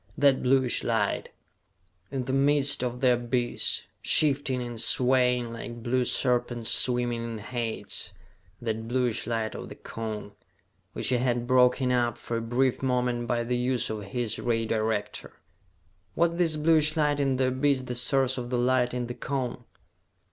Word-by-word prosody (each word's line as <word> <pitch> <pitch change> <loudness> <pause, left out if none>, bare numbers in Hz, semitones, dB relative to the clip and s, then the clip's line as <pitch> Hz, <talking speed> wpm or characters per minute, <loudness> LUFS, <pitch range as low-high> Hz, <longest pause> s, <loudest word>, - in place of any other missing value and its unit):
That 140 -2 +4
bluish 130 -1 +2
light, 115 -3 -1 0.8
in 135 -1 -3
the 130 +1 -3
midst 140 0 +3
of 125 0 -3
the 130 -2 +5
abyss, 120 0 0 0.2
shifting 140 -3 +3
and 120 -2 -5
swaying 125 -2 +1
like 120 0 -8
blue 125 +1 +1
serpents 120 -2 0
swimming 120 -2 +1
in 115 -1 -5
Hades... 115 +1 -4 0.5
that 110 -1 -4
bluish 120 -2 -1
light 115 -2 -2
of - - -7
the - - -9
Cone, 110 -2 -6 0.6
which - - 0
he 125 - +2
had 120 -1 0
broken 125 +1 +3
up 120 -2 +1
for 120 0 -4
a - - -2
brief 120 +3 0
moment 125 -2 0
by 120 0 0
the 125 +1 -1
use 125 -1 -1
of 110 -1 -4
his 115 +2 -3
ray 115 -1 0
director. 110 -1 -2 0.8
Was 170 0 +3
this 170 -2 0
bluish 155 0 +3
light 150 -1 +2
in 135 -2 +1
the 130 0 +1
abyss 130 +1 +1
the 125 -1 -5
source 130 +1 +2
of 120 -1 -6
the 125 - -1
light 125 0 +1
in 125 -1 -2
the 120 - -5
Cone? 125 -2 -4
125 Hz, 160 wpm, -27 LUFS, 120-130 Hz, 0.8 s, the